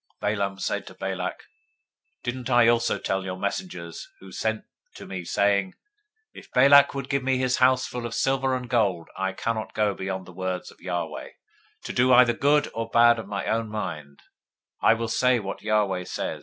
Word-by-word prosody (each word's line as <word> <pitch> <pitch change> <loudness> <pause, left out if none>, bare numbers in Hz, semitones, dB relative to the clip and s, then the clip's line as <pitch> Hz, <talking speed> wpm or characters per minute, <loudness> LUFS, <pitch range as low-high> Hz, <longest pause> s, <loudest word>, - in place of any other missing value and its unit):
024:012 105 +1 +1
Balaam 100 -1 -2
said - - -2
to - - -10
Balak, - - -4 0.8
Didn't 125 0 -4
I 120 -2 +5
also 120 0 +2
tell 95 0 -2
your 95 -1 -5
messengers 100 - -5
who - - -15
you 95 - -12
sent 110 +2 -2 0.3
to - - -10
me, 95 -2 -6
saying, 100 +2 +1 0.6
024:013 - - -9
If - - -21
Balak 140 +2 +6
would 135 -1 -4
give 140 0 0
me 130 0 +1
his 130 -1 +1
house 130 0 +4
full 120 -1 -5
of 115 - -6
silver 135 -1 +1
and 125 -1 -5
gold, 100 -9 0
I 95 0 -2
can't 110 +2 -3
go 105 -1 +1
beyond 95 -1 -5
the 90 - -13
word 95 0 -3
of - - -21
Yahweh, 85 -4 -4 0.5
to - - -5
do 125 +1 +4
either 120 -1 +6
good 145 +4 +2
or 115 0 -4
bad 120 0 +5
of 110 - -7
my 100 -1 -4
own 115 -1 -1
mind; 75 -9 -6 0.6
what 115 0 +3
Yahweh - - -1
speaks, 125 +2 +3 0.3
that - - -2
will 105 -2 +2
I 90 -1 -3
speak? - - -4
110 Hz, 200 wpm, -25 LUFS, 95-125 Hz, 0.8 s, Balak